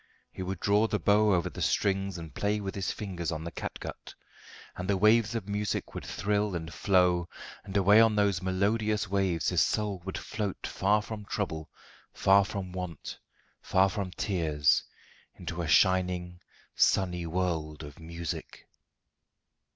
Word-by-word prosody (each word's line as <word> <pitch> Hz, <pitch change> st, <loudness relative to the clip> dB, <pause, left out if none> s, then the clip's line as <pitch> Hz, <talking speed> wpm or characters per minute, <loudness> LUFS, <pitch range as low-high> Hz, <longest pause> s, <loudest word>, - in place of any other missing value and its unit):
He -, -, -8 dB
would 95 Hz, -1 st, -4 dB
draw 105 Hz, +4 st, +3 dB
the 105 Hz, -, 0 dB
bow 105 Hz, +1 st, +4 dB
over 85 Hz, -3 st, +2 dB
the -, -, -7 dB
strings 95 Hz, -2 st, 0 dB
and 80 Hz, -2 st, -9 dB
play 105 Hz, +1 st, 0 dB
with 95 Hz, -2 st, -4 dB
his 95 Hz, -1 st, -2 dB
fingers 90 Hz, -5 st, -4 dB
on 80 Hz, -1 st, -4 dB
the 85 Hz, -, -5 dB
catgut, -, -, -7 dB, 0.6 s
and 90 Hz, +2 st, -5 dB
the 100 Hz, -, +3 dB
waves 110 Hz, +2 st, +4 dB
of 110 Hz, -4 st, -3 dB
music 105 Hz, 0 st, -2 dB
would -, -, -6 dB
thrill 105 Hz, -1 st, 0 dB
and 80 Hz, -1 st, -5 dB
flow, 90 Hz, 0 st, +2 dB, 0.3 s
and 100 Hz, 0 st, -3 dB
away 100 Hz, +3 st, +6 dB
on 115 Hz, -1 st, +4 dB
those 100 Hz, -4 st, +2 dB
melodious 105 Hz, +3 st, 0 dB
waves 95 Hz, -3 st, 0 dB
his 90 Hz, -3 st, +2 dB
soul 105 Hz, -4 st, 0 dB
would 95 Hz, 0 st, -4 dB
float 105 Hz, -4 st, -4 dB
far 105 Hz, +2 st, +1 dB
from 105 Hz, -1 st, -7 dB
trouble, 80 Hz, -7 st, -3 dB, 0.4 s
far 100 Hz, +1 st, +5 dB
from 95 Hz, -1 st, -5 dB
want, 90 Hz, -2 st, -6 dB, 0.4 s
far 95 Hz, +1 st, +3 dB
from 95 Hz, 0 st, -3 dB
tears, 80 Hz, -7 st, +1 dB, 0.5 s
into 85 Hz, +1 st, -5 dB
a 85 Hz, -, -3 dB
shining, 90 Hz, 0 st, +2 dB, 0.3 s
sunny 90 Hz, -3 st, +2 dB
world 80 Hz, -3 st, -2 dB
of 75 Hz, 0 st, -11 dB
music. 85 Hz, 0 st, -6 dB
95 Hz, 155 wpm, -29 LUFS, 85-105 Hz, 0.6 s, away